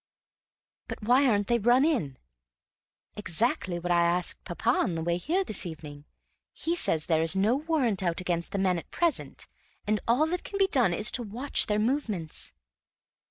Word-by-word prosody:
"But - - -7
why 255 +5 +4
aren't 205 -4 +2
they 235 +3 +1
run 245 +5 +4
in?" 215 - -1 1.0
"Exactly 190 -1 -1
what 175 +1 -3
I 175 0 +4
asked 175 +1 +1
papa 180 +6 -3
on 185 -8 0
the 165 - -3
way 170 +1 0
here 340 - 0
this 215 - +1
evening; 150 -3 -9 0.5
he 335 +1 -2
says 160 - +2
there 160 -2 +1
is 165 +3 +1
no 205 +5 +2
warrant 280 - 0
out 170 -3 -1
against 175 -2 -3
the - - -3
men 185 -2 +1
at - - -14
present, 340 -2 -2 0.4
and 210 0 0
all 250 +7 +3
that 355 +2 -3
can 400 - -6
be 390 - +4
done 250 - +3
is 215 +5 +2
to 255 - 0
watch 240 +6 0
their 210 - +1
movements." 215 - -2
210 Hz, 180 wpm, -27 LUFS, 175-255 Hz, 1.0 s, why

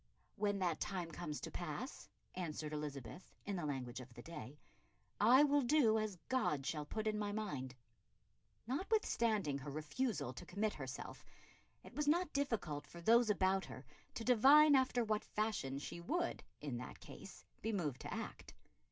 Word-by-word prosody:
"When 205 -1 +1
that 175 -4 0
time 180 -4 -3
comes 155 -2 -4
to - - -5
pass," - - -5 0.2
answered 155 -4 -4
Elizabeth, 150 0 -6
in 200 - -2
the 170 -4 -2
language 130 -3 -3
of 125 0 -10
the 120 - -9
day, 150 -4 -8 0.6
"I 245 +7 +7
will 290 0 +4
do 240 -5 +4
as 215 -3 -2
God 150 - +1
shall 150 0 -2
put 215 +5 -3
in 215 -1 +1
my 205 -1 -1
mind." 145 -12 -3 0.9
Notwithstanding 235 - +1
her 135 +2 -6
refusal 155 - -2
to - - -9
commit 210 +3 0
herself, 135 -1 -6 0.6
it - - -12
was 300 -1 -1
not 345 +2 +3
difficult 225 - -1
for 170 - -11
those 230 +6 +5
about 195 -1 +2
her - - -9 0.3
to 230 - -3
divine 275 +6 +7
after 255 -2 +3
what 215 -1 0
fashion 210 -11 -1
she 145 +4 -6
would, 340 - -1 0.2
in 140 -5 -3
that 125 - -7
case, - - -11 0.2
be 225 - -1
moved 150 - -2
to - - -6
act. - - -6
195 Hz, 165 wpm, -38 LUFS, 150-235 Hz, 0.9 s, I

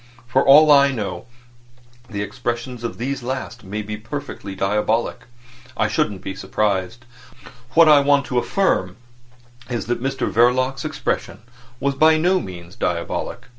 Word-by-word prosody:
For 130 +2 +2
all 150 +2 +7
I 140 -1 +6
know, 110 -2 -5 0.8
the 100 -2 -3
expression 120 +2 -4
of 115 - -4
these 135 +3 -3
last 125 -1 -5
may 105 +2 -5
be 105 +1 -5
perfectly 110 -4 -7
diabolic. 105 +4 -1 0.5
I 110 - +2
shouldn't 105 -3 -1
be 95 - -4
surprised. 95 +2 -2 0.7
What 165 -1 +7
I 150 -2 +8
want 140 0 +3
to 125 - 0
affirm 120 - 0 0.7
is 120 -2 -3
that 120 +1 -2
Mr 135 +1 -2
Verloc's 125 - +2
expression 140 -7 -3 0.4
was 140 0 0
by 155 +3 +4
no 180 +4 +2
means 90 - -9
diabolic. 85 -1 -3
120 Hz, 140 wpm, -21 LUFS, 105-140 Hz, 0.8 s, I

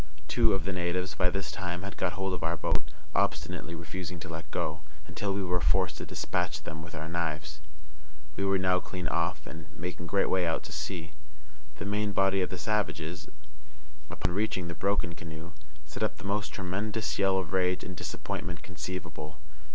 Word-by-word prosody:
Two 115 -4 +5
of 90 -4 -1
the 95 - 0
natives 90 +1 +1
by 90 +3 +4
this 100 +1 -1
time 90 -1 -2
had 100 - -4
got 90 -2 +1
hold 95 0 0
of 90 - -2
our - - +2
boat, 75 - +1 0.2
obstinately 85 - +1
refusing 90 +1 -4
to 90 - -5
let 80 -2 -5
go, 80 +1 0 0.2
until 100 +4 -1
we 100 0 +1
were 90 -1 +2
forced 90 +6 +4
to - - -4
despatch - - 0
them 80 +1 -5
with 85 +1 -8
our 80 0 -3
knives. 80 -3 -1 0.7
We 100 - 0
were 95 0 +4
now 90 -1 +4
clear 90 -2 -3
off, - - +1
and 80 0 -8
making 85 0 -3
great 100 +2 +4
way 90 -2 +3
out 80 - +1
to - - -7
sea. 85 -5 -3 0.6
The 75 - -4
main 105 0 +1
body 95 0 +4
of 90 - +1
the 90 - -3
savages, 90 -3 0 0.8
upon 90 +1 0
reaching 95 -3 +1
the - - -2
broken 95 -2 +2
canoe, 80 0 -7 0.3
set 75 +7 -7
up 110 - +2
the - - -10
most 100 +1 +1
tremendous 105 +3 -1
yell 95 -1 +5
of 90 -2 -1
rage 90 -1 +3
and 90 - -5
disappointment 90 +1 -3
conceivable. 85 -2 -5
90 Hz, 190 wpm, -31 LUFS, 85-95 Hz, 0.8 s, Two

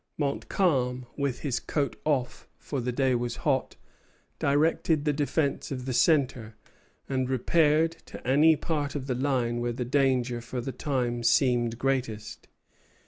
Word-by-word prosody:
Montcalm, 140 -3 0
with 140 -3 -2
his 135 -5 -1
coat 145 -3 -2
off, 135 -5 -1
for 140 -3 -4
the 125 +1 -2
day 130 +1 +1
was 120 -1 -1
hot, 135 -3 +1 0.6
directed 155 +2 +2
the 150 - +2
defence 145 0 -1
of 130 -2 -5
the 130 - -2
centre, 125 -5 +2 0.5
and 130 -1 -1
repaired 155 +5 +2
to - - -10
any 150 +5 +5
part 145 -2 -2
of 140 -3 -3
the 135 - -1
line 125 -2 0
where 120 0 -1
the 125 +1 -3
danger 125 -2 +1
for 120 +2 -5
the 125 +2 -4
time 125 -2 -2
seemed 120 0 +2
greatest. 125 -5 -2
130 Hz, 145 wpm, -27 LUFS, 125-145 Hz, 0.6 s, any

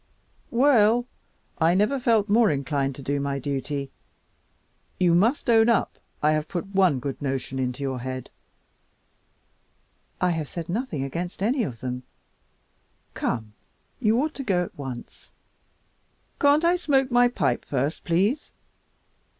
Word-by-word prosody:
Well, 240 -2 +4 0.5
I 165 +2 +4
never 215 +8 +2
felt 225 -4 +2
more 220 +2 +4
inclined 140 -2 -1
to 140 - -9
do 140 +1 -1
my 140 0 -2
duty. 140 0 -3 1.1
You 175 -2 +4
must 225 - +2
own 225 -1 +5
up 230 - +1 0.2
I 150 - +5
have 155 0 0
put 175 -3 -3
one 185 -7 +4
good 135 +3 -5
notion 135 -1 -3
into 125 +1 -2
your 130 -2 -2
head?" 130 +1 -6 1.9
"I 180 - +2
have 160 -4 -3
said 170 -1 -6
nothing 215 - -2
against 175 +7 -4
any 250 +5 +2
of 125 - -4
them. 125 0 -4 1.1
Come, 110 -3 -3 0.5
you 225 0 +2
ought 310 +3 0
to 275 - -6
go 185 -7 +1
at - - -9
once." 130 -4 -9 1.1
"Can't 290 +3 +4
I 350 +1 +4
smoke 270 -6 +1
my 245 0 +5
pipe 130 - 0
first 140 +3 -2
please?" 200 - 0
175 Hz, 140 wpm, -25 LUFS, -, 1.9 s, own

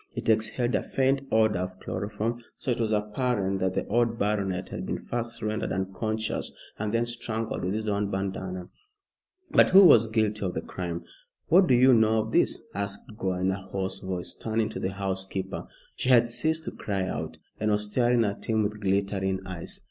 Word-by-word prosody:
It - - -3
exhaled 110 +3 +1
a - - +2
faint 135 +1 +1
odor 110 -3 +3
of 90 +1 -4
chloroform, 110 +5 -3 0.2
so 130 - -2
it 120 - -1
was 110 -1 0
apparent 105 -2 0
that 95 0 0
the - - 0
old 115 +1 +1
baronet 100 -3 -1
had - - -5
been - - -4
first 115 -1 -4
rendered 110 0 -1
unconscious, 110 +4 -2 0.3
and 105 0 -1
then 115 +1 +1
strangled 115 -1 -3
with 95 +3 -1
his 110 0 -3
own 100 -1 0
bandana. 95 -2 -3 0.8
But - - +6
who 195 +1 +9
was 120 - +7
guilty 110 -1 0
of 90 -2 -2
the - - -1
crime? 85 -2 -5 0.5
"What 180 +3 +6
do 125 - +5
you 130 +2 +6
know 110 -1 +4
of 110 - -7
this?" - - +2
asked 100 +1 -5
Gore, 95 -3 -2
in 95 +1 +2
a 95 +1 -4
hoarse 95 0 -4
voice, 95 -2 -4
turning 110 -1 -1
to - - -6
the 95 - -2
housekeeper. 95 -1 -3 0.3
She 125 - -2
had 120 -2 +5
ceased 160 +6 0
to - - -3
cry 100 -2 -2
out, 95 - -4 0.2
and 110 - +1
was 105 0 0
staring 120 0 +3
at 100 -1 -3
him 110 -1 +2
with 105 +1 -3
glittering 95 -1 0
eyes. 90 -3 -5
105 Hz, 195 wpm, -27 LUFS, 95-115 Hz, 0.8 s, who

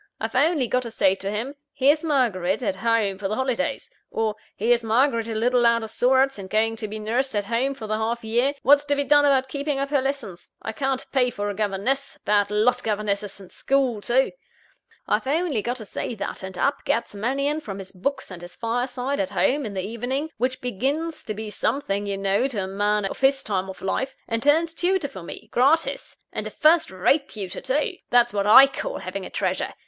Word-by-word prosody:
I've 225 +2 -3
only 290 +1 +3
got 250 +2 +1
to 240 - -6
say 190 -4 +3
to 195 0 -4
him: 225 +7 -3 0.2
'Here's 285 +3 +3
Margaret 225 - +1
at 195 -4 -1
home 215 -3 +1
for 195 - -2
the 215 - -2
holidays;' 260 - -1 0.2
or, 220 -1 -1 0.2
'Here's 235 +2 +2
Margaret 230 0 +2
a 225 - -4
little 245 +2 +2
out 235 -1 +4
of 220 - -6
sorts, 260 +1 +2
and 190 -1 -8
going 225 +2 +1
to 220 -1 -4
be 215 +1 -6
nursed 230 +4 -1
at 205 - +1
home 245 +6 0
for 225 - -7
the 215 0 -1
half 230 +2 -2
year 240 +6 +1
what's 285 +1 +6
to 285 0 +1
be 285 - 0
done 290 +1 +5
about 265 -2 +3
keeping 280 +1 -2
up 275 +1 -2
her 285 -2 +3
lessons? 270 -10 -5
I - - -5
can't 270 -2 -2
pay 255 -2 +3
for 205 -3 -3
a - - -5
governess 215 +7 -2
(bad 205 -1 +3
lot, 225 +4 +2
governesses!) 205 -2 -2
and 190 -2 -13
school 260 -6 0
too.' 255 +5 +2 0.8
I've - - 0
only 300 -5 +1
got 245 +4 -2
to 220 - -7
say 230 - -4
that; 200 -1 -5
and 190 -1 -7
up 280 - 0
gets 230 - -1
Mannion 275 +8 -1
from 195 -8 -6
his 190 -1 -8
books 265 +6 -3
and 175 -2 -8
his 175 0 -10
fireside 250 +4 -2
at 290 -1 0
home, 275 -2 +1
in 200 - -7
the 190 0 -2
evening 250 +8 -3
which 255 +3 -1
begins 280 +8 -2
to 215 - -4
be 215 0 -6
something, 205 -5 -1
you 200 -1 -2
know, 195 +6 +1
to 220 -8 -2
a - - -4
man 205 +1 0
of 195 - -4
his 270 0 +3
time 190 -2 -2
of 190 - -9
life 265 +7 -2
and 230 0 -1
turns 320 +5 +3
tutor 355 -2 0
for 190 - -9
me, 170 - -9
gratis; 285 +7 +2 0.2
and - - -3
a - - -4
first 320 +2 +3
rate 275 - +1
tutor, 195 -4 -6
too! 300 +8 -1
That's 240 -2 +4
what 200 0 0
I 265 +6 +10
call - - -4
having - - -5
a - - -11
treasure! - - -2
240 Hz, 220 wpm, -24 LUFS, 210-275 Hz, 0.8 s, I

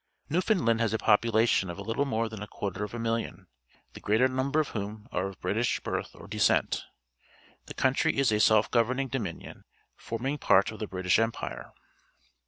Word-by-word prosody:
Newfoundland 170 - +2
has 115 -2 +1
a - - +2
population 110 -2 +3
of 85 - -6
a 100 - -6
httle 115 +7 -1
more 115 -3 0
than 110 -2 -8
a 105 - -6
quarter 100 0 -4
of 105 +2 -5
a - - -3
million, 115 0 -3 0.5
the - - -10
greater 110 +5 +3
number 130 +3 0
of 155 - 0
whom 105 +1 -6
are 90 +2 -1
of 95 - -10
British 110 +7 0
birth - - -4
or - - -12
descent. - - +2 0.9
The__country 130 0 +1
is 135 -4 +2
a 105 - +2
self 110 0 +4
goA'erning 130 +3 +1
Dominion, 105 -11 -5 0.3
forming 130 +6 -4
part 95 +3 +4
of 110 - -10
the 110 - -3
British 95 0 +1
Empire. 115 0 -3
115 Hz, 180 wpm, -28 LUFS, 105-130 Hz, 0.9 s, self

